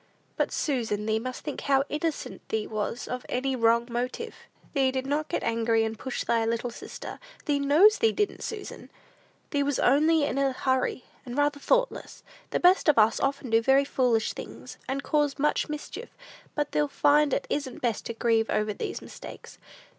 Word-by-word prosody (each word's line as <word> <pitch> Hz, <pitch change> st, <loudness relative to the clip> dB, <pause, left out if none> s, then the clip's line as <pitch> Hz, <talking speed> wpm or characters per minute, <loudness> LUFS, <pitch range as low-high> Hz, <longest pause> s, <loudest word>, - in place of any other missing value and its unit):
"But, -, -, 0 dB
Susan, 225 Hz, -7 st, -1 dB
thee 220 Hz, 0 st, +1 dB
must 255 Hz, +2 st, -6 dB
think 295 Hz, -, -5 dB
how 275 Hz, -1 st, +3 dB
innocent 305 Hz, +1 st, -3 dB
thee 220 Hz, -1 st, -1 dB
was 215 Hz, +2 st, -3 dB
of 250 Hz, 0 st, -4 dB
any 265 Hz, +1 st, 0 dB
wrong 235 Hz, 0 st, +3 dB
motive. 250 Hz, -, -3 dB, 0.4 s
Thee 270 Hz, -3 st, +3 dB
did 260 Hz, 0 st, -2 dB
not 295 Hz, +2 st, -1 dB
get -, -, -2 dB
angry, 230 Hz, 0 st, +2 dB
and 220 Hz, 0 st, -2 dB
push 260 Hz, -, -3 dB
thy 230 Hz, -1 st, +1 dB
little 230 Hz, +2 st, -1 dB
sister, -, -, -8 dB, 0.3 s
thee 290 Hz, -2 st, +1 dB
knows 310 Hz, +10 st, +5 dB
thee 450 Hz, -1 st, +4 dB
didn't, 415 Hz, -1 st, -1 dB
Susan! 425 Hz, -3 st, -7 dB, 0.6 s
Thee 285 Hz, -, +1 dB
was 280 Hz, -1 st, 0 dB
only 305 Hz, +4 st, +4 dB
in 280 Hz, -1 st, 0 dB
a 275 Hz, -1 st, +2 dB
hurry, 260 Hz, -1 st, 0 dB, 0.2 s
and 245 Hz, +1 st, -7 dB
rather 290 Hz, 0 st, +2 dB
thoughtless. -, -, 0 dB, 0.3 s
The -, -, 0 dB
best 360 Hz, -2 st, +5 dB
of 295 Hz, -, +4 dB
us 220 Hz, 0 st, +4 dB
often 275 Hz, -3 st, -1 dB
do 225 Hz, 0 st, +5 dB
very 270 Hz, +3 st, +4 dB
foolish 245 Hz, -5 st, +1 dB
things, -, -, -9 dB
and 275 Hz, +2 st, -2 dB
cause 295 Hz, -2 st, +1 dB
much 300 Hz, +1 st, +1 dB
mischief; 300 Hz, +10 st, -6 dB, 0.5 s
but 295 Hz, -1 st, -1 dB
thee'll 295 Hz, -, +1 dB
find 290 Hz, +1 st, +3 dB
it -, -, 0 dB
isn't 275 Hz, -4 st, -3 dB
best 230 Hz, -4 st, -1 dB
to 230 Hz, -, -5 dB
grieve 225 Hz, -1 st, +2 dB
over 210 Hz, 0 st, 0 dB
these -, -, -5 dB
mistakes. -, -, -11 dB
270 Hz, 185 wpm, -27 LUFS, 230-295 Hz, 0.6 s, knows